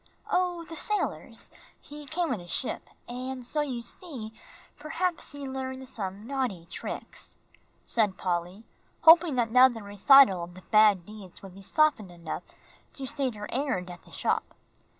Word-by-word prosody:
"Oh, 355 -2 0
the 330 - -8
sailors; 420 +5 -2 0.3
he 295 0 -11
came 325 -1 -1
in 210 - -4
a 175 - -12
ship, 240 +8 -2 0.2
and 255 +1 -5
so 300 +5 +1
you 260 -5 -3
see, 240 -9 -3 0.4
perhaps 335 +3 -3
he 285 -1 -7
learned 265 0 -5
some 200 -2 -5
naughty 250 -10 -2
tricks," - - -8 0.5
said 210 -5 +1
Polly, 180 +3 -2 0.4
hoping 330 -2 +7
that 235 -2 +1
now 255 +2 +8
the 230 -4 -6
recital 205 -1 +6
of 175 +1 -9
the 185 - -12
bad 210 -5 +5
deeds 205 -3 -11
would 195 -2 -10
be 195 - -12
softened 280 - +2
enough 170 -2 -6 0.5
to 270 - -6
state 260 -2 -2
her 210 0 -6
errand 250 -10 -1
at 175 - -11
the - - -19
shop. - - -1
245 Hz, 160 wpm, -28 LUFS, 195-285 Hz, 0.5 s, now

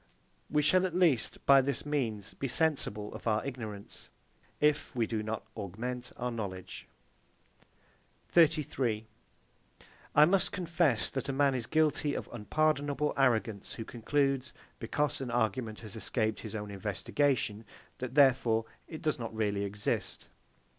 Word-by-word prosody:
We 150 0 +2
shall 185 +5 +4
at 175 - -7
least, 165 -10 +2
by 140 -1 +8
this 135 0 -2
means, 115 -9 -2
be 135 - -3
sensible 125 -8 0
of - - -7
our 110 -1 +1
ignorance, 110 -7 -7 0.5
if 150 -1 +1
we 120 -2 +2
do 110 -1 -2
not 110 +1 -4
augment 120 +5 -4
our 125 0 -2
knowledge. 100 -5 -6 1.4
33. 135 -9 +2 1.1
I 150 - +9
must 185 +3 +2
confess 165 - +1
that 135 0 -3
a - - +2
man 140 0 +3
is 120 -3 -2
guilty 155 -2 +2
of - - -4
unpardonable 145 +4 0
arrogance 115 -6 +1
who 115 - -6
concludes, 135 +3 0 0.3
because 145 +5 -1
an 130 - -3
argument 115 -1 -1
has 110 -4 -8
escaped 110 +1 -1
his 110 -1 -7
own 105 -1 -5
investigation, 110 +3 0 0.4
that 130 0 -5
therefore 125 -5 +4 0.2
it 160 -3 -8
does 155 -3 0
not 115 -2 -4
really 105 -2 0
exist. 100 +1 -2
125 Hz, 140 wpm, -31 LUFS, 110-145 Hz, 1.4 s, I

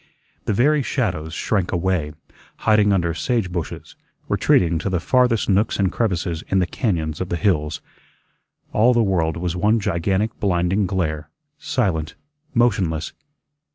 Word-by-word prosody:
The 110 - 0
very 145 +8 +3
shadows 90 - -2
shrank 100 -5 -1
away, 90 -4 -1 0.5
hiding 105 -2 +4
under 85 -4 +1
sage 105 +1 -1
bushes, 85 -4 -5 0.3
retreating 85 -2 +2
to 95 - -2
the 90 -2 0
farthest 125 +4 +2
nooks 100 +2 +2
and 95 -2 +1
crevices 90 -7 -1
in 95 - +1
the 90 - +3
cañóns 85 - -2
of 95 - -3
the - - -1
hills. 75 -3 0 0.9
All 120 +4 +4
the 120 - +4
world 85 -5 0
was 85 0 -2
one 105 +5 +2
gigantic 95 +2 -1
blinding 95 +1 +1
glare, 80 -5 -2 0.3
silent, 95 - -1 0.4
motionless. 95 -10 +1
95 Hz, 140 wpm, -21 LUFS, 85-105 Hz, 0.9 s, hiding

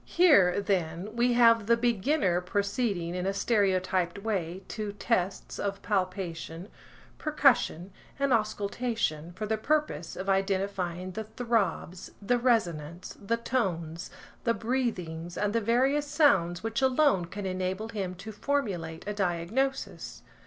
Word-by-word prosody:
Here, 235 - +5
then, 190 0 -2
we 240 +1 +3
have 230 -3 +5
the 235 0 +5
beginner 230 - +1
proceeding 200 -2 -1
in 180 +1 -2
a 195 - -1
stereotyped 190 -4 +1
way 190 -4 -2
to 210 -2 -4
tests 195 -3 -1
of 200 -1 -2
palpation, 185 -2 -3 0.5
percussion, 270 - +2 0.3
and 280 -2 +2
auscultation, 215 -6 -1
for 215 +4 -4
the 220 0 -1
purpose 285 - -1
of 190 - -5
identifying 190 -2 -1
the 220 +3 -5
throbs, 220 -6 -2
the 245 +4 +1
resonance, 175 -9 0
the 230 +4 0
tones, 175 -9 -2 0.3
the 230 -1 +2
breathings, 190 -9 -2
and 205 0 0
the 230 - +2
various 265 +7 +2
sounds 205 - +3
which 225 +2 -1
alone 265 - +3
can 195 +4 -6
enable 185 +3 -2
him 195 -5 -4
to 195 +5 -8
formulate 200 - -2
a 210 - -1
diagnosis. 205 +8 -2
200 Hz, 130 wpm, -29 LUFS, 180-235 Hz, 0.5 s, Here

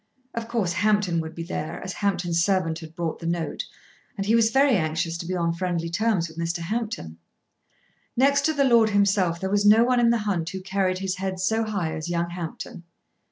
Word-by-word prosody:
Of 230 -1 -4
course 220 -7 0
Hampton 200 -2 +2
would 160 0 -5
be 165 - -5
there 165 -2 -4
as 185 -1 -4
Hampton's 175 -4 0
servant 180 -4 +1
had 160 -1 -11
brought 170 -2 -3
the 165 - -5
note, 170 -1 -2 0.5
and 195 - -2
he 215 - +2
was 230 -1 +5
very 270 +1 +4
anxious 165 -1 -1
to 170 - -6
be 185 - -2
on 170 -1 0
friendly 170 -1 -2
terms 195 -2 +1
with 160 0 -11
Mr. 170 +1 -1
Hampton. 170 - -4 1.0
Next 280 +2 +4
to 315 - +2
the 285 -2 +2
lord 235 -3 +5
himself 200 -4 +2
there 190 +1 -3
was 205 0 +2
no 215 +3 +7
one 250 0 +2
in 235 -1 +4
the 235 - +3
hunt 195 -7 -1
who 190 0 -6
carried 190 -1 0
his 190 0 -3
head 190 0 -3
so 220 +4 +1
high 200 -7 -2
as 155 +2 -5
young 170 0 -1
Hampton. 170 -1 -6
185 Hz, 210 wpm, -25 LUFS, 170-215 Hz, 1.0 s, no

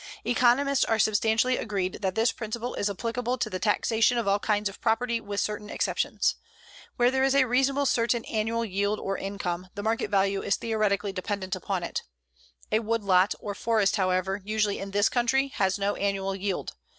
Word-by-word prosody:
Economists 255 +3 +3
are 225 - +1
substantially 220 +4 +2
agreed 195 -4 -2
that 190 -2 -1
this 225 +2 +3
principle 235 +2 -5
is 205 - -1
applicable 235 +4 -2
to - - -2
the 185 - -3
taxation 225 +3 +2
of 230 -4 -1
all 200 +1 +3
kinds 210 0 0
of 200 - -9
property 235 0 +1
with 200 -1 -4
certain 210 0 -3
exceptions. - - 0 0.6
Where 245 +1 +3
there 265 0 +1
is 270 0 +3
a 275 -2 +5
reasonably 270 +3 +2
certain 235 -2 +1
annual 225 +1 -1
yield 200 +1 -1
or 195 - -2
income 185 -3 -4
the 205 - -5
market 220 -1 0
value 195 -1 +1
is 200 - +1
theoretically 210 -3 0
dependent 190 0 -3
upon 185 0 -3
it. - - -3 0.7
A 215 - +3
woodlot 205 -4 +2
or 205 - -5
forest, 220 -1 +1
however, 185 +1 0
usually 210 0 0
in 195 - -5
this 205 +1 +3
country 265 +3 +1
has 195 -6 0
no 200 0 0
annual 195 -1 -1
yield. 195 -1 -3
210 Hz, 180 wpm, -27 LUFS, 195-235 Hz, 0.7 s, a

